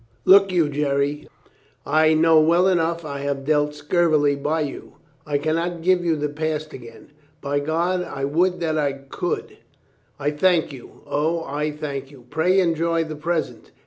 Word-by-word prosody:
"Look 195 Hz, 0 st, +6 dB
you, 170 Hz, -4 st, +2 dB
Jerry. 145 Hz, 0 st, -1 dB, 0.6 s
I 155 Hz, 0 st, +3 dB
know 160 Hz, 0 st, +5 dB
well 170 Hz, +4 st, +3 dB
enough 170 Hz, -2 st, 0 dB
I 140 Hz, -2 st, -5 dB
have 140 Hz, -1 st, -3 dB
dealt 150 Hz, 0 st, +1 dB
scurvily 150 Hz, -1 st, +2 dB
by 150 Hz, +3 st, -1 dB
you. 145 Hz, -3 st, -6 dB, 0.3 s
I 145 Hz, -1 st, +1 dB
can 155 Hz, +2 st, -1 dB
not 170 Hz, 0 st, -3 dB
give 180 Hz, 0 st, +3 dB
you 165 Hz, -2 st, +1 dB
the 150 Hz, -1 st, -2 dB
past 155 Hz, +1 st, -4 dB
again. 115 Hz, +2 st, -12 dB, 0.3 s
By 145 Hz, 0 st, -1 dB
God, 170 Hz, +5 st, 0 dB
I 135 Hz, -5 st, -4 dB
would 180 Hz, +6 st, +1 dB
that 155 Hz, -2 st, 0 dB
I 140 Hz, -2 st, 0 dB
could 140 Hz, +5 st, -5 dB, 0.2 s
— -, -, -39 dB
" -, -, -40 dB
"I 145 Hz, +1 st, 0 dB
thank 160 Hz, 0 st, +1 dB
you, 130 Hz, -, -13 dB
O, 165 Hz, +3 st, -1 dB
I 150 Hz, +1 st, -2 dB
thank 140 Hz, -3 st, -6 dB
you. 135 Hz, -4 st, -16 dB
Pray 180 Hz, +5 st, +2 dB
enjoy 165 Hz, -1 st, +1 dB
the 155 Hz, -1 st, -7 dB
present." 160 Hz, +2 st, -3 dB
155 Hz, 175 wpm, -22 LUFS, 145-170 Hz, 0.6 s, Look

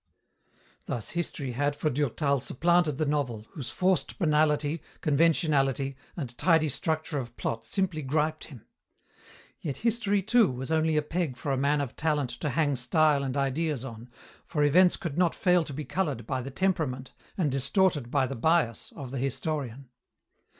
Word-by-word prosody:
Thus 110 Hz, -4 st, -4 dB
history 160 Hz, -6 st, -3 dB
had 145 Hz, +4 st, 0 dB
for 155 Hz, +1 st, 0 dB
Durtal 140 Hz, +1 st, 0 dB
supplanted 170 Hz, +2 st, +2 dB
the 155 Hz, -, 0 dB
novel, 135 Hz, -7 st, -1 dB
whose 140 Hz, -6 st, -6 dB
forced 185 Hz, 0 st, 0 dB
banality, 150 Hz, -1 st, +2 dB, 0.2 s
conventionality, 145 Hz, -3 st, +2 dB, 0.2 s
and 125 Hz, -7 st, -5 dB
tidy 160 Hz, -3 st, +4 dB
structure 155 Hz, +1 st, -1 dB
of 120 Hz, -2 st, -8 dB
plot 115 Hz, 0 st, -3 dB
simply 185 Hz, -5 st, -1 dB
griped 155 Hz, +3 st, -1 dB
him. 130 Hz, -8 st, -13 dB, 0.9 s
Yet 145 Hz, -5 st, -4 dB
history, 210 Hz, -4 st, +1 dB
too, 220 Hz, 0 st, +4 dB
was 130 Hz, +4 st, -5 dB
only 160 Hz, -1 st, +2 dB
a 150 Hz, -, +2 dB
peg 160 Hz, -4 st, -2 dB
for 140 Hz, -, -3 dB
a -, -, +2 dB
man 140 Hz, +2 st, +2 dB
of 135 Hz, -4 st, -5 dB
talent 150 Hz, -5 st, 0 dB
to 150 Hz, -, -1 dB
hang 145 Hz, +1 st, +1 dB
style 145 Hz, +3 st, +3 dB
and 135 Hz, 0 st, -2 dB
ideas 140 Hz, 0 st, -1 dB
on, 115 Hz, -1 st, -9 dB, 0.4 s
for 150 Hz, -, 0 dB
events 175 Hz, +5 st, +5 dB
could 170 Hz, -2 st, -4 dB
not 175 Hz, -2 st, +3 dB
fail 180 Hz, -2 st, +3 dB
to 145 Hz, -, -7 dB
be 150 Hz, +2 st, -5 dB
coloured 145 Hz, -, -2 dB
by 130 Hz, -, -2 dB
the 130 Hz, -, -6 dB
temperament 140 Hz, -6 st, -1 dB, 0.2 s
and 160 Hz, -7 st, +1 dB
distorted 140 Hz, -, +1 dB
by 135 Hz, 0 st, +2 dB
the 135 Hz, -, -4 dB
bias 130 Hz, -3 st, +1 dB
of 130 Hz, -3 st, -7 dB
the 135 Hz, -, -3 dB
historian. 135 Hz, -1 st, -3 dB
150 Hz, 165 wpm, -28 LUFS, 135-165 Hz, 0.9 s, events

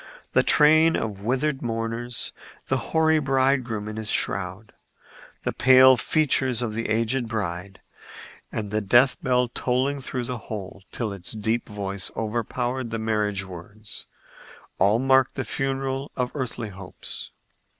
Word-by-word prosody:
The -, -, +6 dB
train 155 Hz, +2 st, +5 dB
of 100 Hz, -3 st, -3 dB
withered 135 Hz, +5 st, 0 dB
mourners, 115 Hz, 0 st, -3 dB, 0.4 s
the -, -, +2 dB
hoary 160 Hz, -1 st, +4 dB
bridegroom 130 Hz, -6 st, +1 dB
in 110 Hz, 0 st, -6 dB
his 110 Hz, -1 st, -3 dB
shroud, 95 Hz, +3 st, -1 dB, 0.7 s
the -, -, -1 dB
pale 130 Hz, 0 st, +7 dB
features 130 Hz, -2 st, +1 dB
of 110 Hz, -3 st, -2 dB
the 115 Hz, +1 st, -3 dB
aged 115 Hz, +3 st, 0 dB
bride 95 Hz, -3 st, -4 dB, 0.7 s
and 105 Hz, -2 st, -4 dB
the 110 Hz, 0 st, 0 dB
death 120 Hz, +6 st, +4 dB
bell 125 Hz, -1 st, +2 dB
tolling 130 Hz, +4 st, 0 dB
through 125 Hz, -1 st, -3 dB
the 125 Hz, 0 st, -4 dB
whole 100 Hz, -3 st, -7 dB
till 110 Hz, -4 st, -3 dB
its 95 Hz, +1 st, -4 dB
deep 110 Hz, +2 st, -1 dB
voice 100 Hz, -2 st, -2 dB
overpowered 120 Hz, +3 st, -2 dB
the 115 Hz, -, -3 dB
marriage 105 Hz, -3 st, 0 dB
words,—all 105 Hz, +1 st, -4 dB
marked 130 Hz, +1 st, +3 dB
the 130 Hz, -, -3 dB
funeral 135 Hz, 0 st, -2 dB
of 125 Hz, -1 st, -1 dB
earthly 125 Hz, -5 st, -4 dB
hopes. 95 Hz, -1 st, -7 dB
115 Hz, 135 wpm, -25 LUFS, 105-130 Hz, 0.7 s, pale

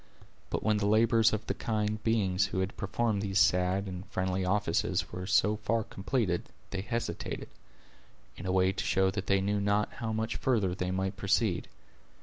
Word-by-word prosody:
But -, -, -2 dB
when 110 Hz, -1 st, +2 dB
the 100 Hz, 0 st, 0 dB
labors 110 Hz, 0 st, +4 dB
of 110 Hz, 0 st, -2 dB
the -, -, -1 dB
kind 110 Hz, -1 st, -2 dB
beings 100 Hz, -4 st, +2 dB
who 95 Hz, -, -3 dB
had 95 Hz, +1 st, -3 dB
performed 105 Hz, +1 st, -1 dB
these 100 Hz, -1 st, -1 dB
sad 90 Hz, +1 st, +3 dB
and 90 Hz, -1 st, -6 dB
friendly 95 Hz, 0 st, -1 dB
offices 90 Hz, -2 st, 0 dB
were 90 Hz, +1 st, -5 dB
so 105 Hz, +2 st, +3 dB
far 115 Hz, +1 st, 0 dB
completed, 95 Hz, -3 st, -2 dB, 0.2 s
they 95 Hz, -, -2 dB
hesitated, 115 Hz, +3 st, -4 dB, 0.9 s
in 90 Hz, -, -7 dB
a -, -, +1 dB
way 95 Hz, 0 st, +3 dB
to 95 Hz, -, -3 dB
show 95 Hz, 0 st, +2 dB
that 100 Hz, 0 st, -4 dB
they 100 Hz, -1 st, +3 dB
knew 100 Hz, +1 st, 0 dB
not 100 Hz, +1 st, +1 dB
how 115 Hz, -2 st, -4 dB
much 110 Hz, +1 st, -2 dB
further 105 Hz, -8 st, +1 dB
they 90 Hz, 0 st, -2 dB
might 95 Hz, +1 st, -2 dB
proceed. 100 Hz, -1 st, +1 dB
100 Hz, 180 wpm, -30 LUFS, 95-110 Hz, 0.9 s, labors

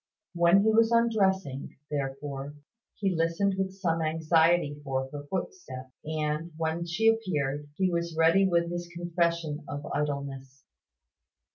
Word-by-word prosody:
When 170 Hz, +3 st, +5 dB
he 220 Hz, -, +4 dB
was 225 Hz, +1 st, +5 dB
undressing, 195 Hz, -, +1 dB
therefore, 140 Hz, 0 st, -4 dB, 0.4 s
he 195 Hz, -3 st, 0 dB
listened 165 Hz, +4 st, +1 dB
with 190 Hz, 0 st, -1 dB
some 170 Hz, -4 st, -1 dB
anxiety 160 Hz, -1 st, +2 dB
for 135 Hz, -1 st, -2 dB
her 145 Hz, 0 st, -7 dB
footsteps, 170 Hz, -, -5 dB
and, 155 Hz, +1 st, -2 dB
when 165 Hz, +1 st, -1 dB
she 200 Hz, +7 st, +1 dB
appeared, 150 Hz, -10 st, 0 dB
he 185 Hz, +1 st, +1 dB
was 170 Hz, -1 st, -2 dB
ready 165 Hz, +4 st, +5 dB
with 170 Hz, -1 st, +1 dB
his 175 Hz, 0 st, -4 dB
confession 170 Hz, -3 st, -1 dB
of 145 Hz, 0 st, -5 dB
idleness. 140 Hz, -2 st, -3 dB
165 Hz, 130 wpm, -28 LUFS, 145-185 Hz, 0.4 s, When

